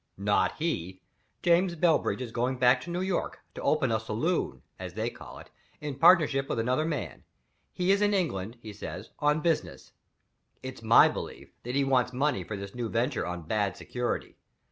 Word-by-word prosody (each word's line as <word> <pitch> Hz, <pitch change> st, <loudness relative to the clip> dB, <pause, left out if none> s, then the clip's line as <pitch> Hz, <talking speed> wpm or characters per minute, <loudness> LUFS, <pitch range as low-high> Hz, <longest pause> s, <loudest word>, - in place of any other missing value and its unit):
"Not 100 Hz, +1 st, +2 dB
he! 95 Hz, -, -3 dB, 0.4 s
James 175 Hz, +1 st, +3 dB
Bellbridge 165 Hz, -5 st, +2 dB
is 120 Hz, -, -7 dB
going 125 Hz, +3 st, -1 dB
back 125 Hz, 0 st, +4 dB
to 170 Hz, -, -8 dB
New 175 Hz, +1 st, -2 dB
York, 190 Hz, -2 st, -2 dB
to -, -, -7 dB
open 135 Hz, -6 st, +2 dB
a 110 Hz, -, +2 dB
saloon 110 Hz, -, -2 dB, 0.2 s
(as -, -, -7 dB
they -, -, -1 dB
call -, -, -11 dB
it) -, -, -13 dB, 0.3 s
in 150 Hz, -1 st, -4 dB
partnership 140 Hz, -2 st, +5 dB
with -, -, -1 dB
another 125 Hz, +7 st, +1 dB
man. 155 Hz, -4 st, -4 dB, 0.5 s
He's 195 Hz, +3 st, +2 dB
in 205 Hz, 0 st, +3 dB
England, 120 Hz, -, -1 dB
he 110 Hz, -1 st, -8 dB
says, 100 Hz, -, -7 dB
on 150 Hz, 0 st, +2 dB
business. 165 Hz, 0 st, -1 dB, 0.7 s
It's -, -, -7 dB
my -, -, +7 dB
belief -, -, -6 dB
that 125 Hz, +2 st, -4 dB
he 140 Hz, -, +3 dB
wants 130 Hz, -2 st, +2 dB
money 135 Hz, -6 st, 0 dB
for 100 Hz, +4 st, -5 dB
this 100 Hz, 0 st, -7 dB
new 120 Hz, -2 st, -3 dB
venture 120 Hz, +2 st, 0 dB
on 90 Hz, -1 st, -5 dB
bad 100 Hz, +2 st, -1 dB
security. 125 Hz, -1 st, -3 dB
130 Hz, 180 wpm, -28 LUFS, 110-160 Hz, 0.7 s, my